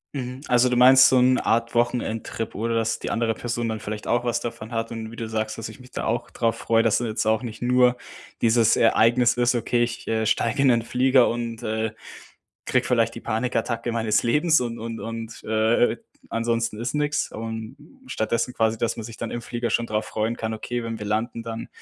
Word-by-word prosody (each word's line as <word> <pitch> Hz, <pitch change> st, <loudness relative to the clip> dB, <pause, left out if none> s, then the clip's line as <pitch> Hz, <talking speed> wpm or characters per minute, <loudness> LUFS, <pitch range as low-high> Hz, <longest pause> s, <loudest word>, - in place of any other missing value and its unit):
Mhm, 125 Hz, -1 st, -5 dB
also, 125 Hz, +1 st, +4 dB
du 125 Hz, -, +1 dB
meinst, 130 Hz, +1 st, +8 dB
so 130 Hz, -, +3 dB
'n 130 Hz, +1 st, +4 dB
Art 115 Hz, +1 st, 0 dB
Wochenendtrip 115 Hz, -2 st, -1 dB
oder 115 Hz, +3 st, -1 dB
dass 115 Hz, -1 st, 0 dB
die -, -, -4 dB
andere 115 Hz, -1 st, 0 dB
Person 120 Hz, +1 st, -3 dB
dann 110 Hz, -1 st, -3 dB
vielleicht 105 Hz, 0 st, -6 dB
auch 120 Hz, 0 st, +1 dB
was 120 Hz, -1 st, 0 dB
davon 115 Hz, -1 st, -6 dB
hat 115 Hz, 0 st, -3 dB
und 110 Hz, -1 st, -6 dB
wie 115 Hz, -, -11 dB
du 115 Hz, -, -4 dB
sagst, 110 Hz, 0 st, -3 dB
dass 115 Hz, -, -5 dB
ich 115 Hz, +4 st, -12 dB
mich 125 Hz, -, -16 dB
da -, -, -4 dB
auch 115 Hz, +2 st, -2 dB
drauf 115 Hz, -1 st, 0 dB
freue. 115 Hz, 0 st, +2 dB
Dass 115 Hz, -2 st, +2 dB
da 120 Hz, -, -3 dB
jetzt 110 Hz, -1 st, -2 dB
auch 110 Hz, +2 st, +1 dB
nicht 110 Hz, -2 st, -7 dB
nur 125 Hz, 0 st, +3 dB, 0.4 s
dieses 115 Hz, -1 st, +4 dB
Ereignis 120 Hz, +2 st, +4 dB
ist: 120 Hz, 0 st, +2 dB
„Okay, 120 Hz, 0 st, +1 dB
ich, 120 Hz, -1 st, -5 dB
äh 110 Hz, 0 st, 0 dB
steige 115 Hz, +3 st, +1 dB
in 135 Hz, -, +5 dB
'n 115 Hz, -1 st, +2 dB
Flieger, 125 Hz, +1 st, +3 dB
und, 115 Hz, 0 st, -4 dB
äh, 110 Hz, 0 st, -1 dB, 0.7 s
kriege -, -, +1 dB
vielleicht 115 Hz, -2 st, +1 dB
die -, -, -6 dB
Panikattacke 115 Hz, 0 st, -2 dB
meines 115 Hz, -2 st, +1 dB
Lebens 155 Hz, +7 st, +3 dB
und 120 Hz, -1 st, -3 dB
und 115 Hz, 0 st, -6 dB
und, 115 Hz, 0 st, -7 dB
äh, 110 Hz, +2 st, +2 dB, 0.3 s
ansonsten 115 Hz, -1 st, -1 dB
ist 120 Hz, +3 st, -3 dB
nix.“ 150 Hz, 0 st, 0 dB
Und 110 Hz, 0 st, -6 dB, 0.3 s
stattdessen 115 Hz, -, -1 dB
quasi, 110 Hz, 0 st, +1 dB
dass 115 Hz, -, -1 dB
man 115 Hz, -, -5 dB
sich 115 Hz, +1 st, -9 dB
dann 115 Hz, -, -5 dB
im 120 Hz, -, -4 dB
Flieger 120 Hz, 0 st, -3 dB
schon 120 Hz, -, +1 dB
drauf 110 Hz, 0 st, -1 dB
freuen 110 Hz, +2 st, -2 dB
kann: 110 Hz, -1 st, -3 dB
„Okay, 120 Hz, +2 st, -4 dB
wenn 115 Hz, -1 st, -5 dB
wir 105 Hz, -, -5 dB
landen, 115 Hz, +2 st, -2 dB
dann 115 Hz, 0 st, -6 dB
115 Hz, 215 wpm, -24 LUFS, 110-120 Hz, 0.7 s, meinst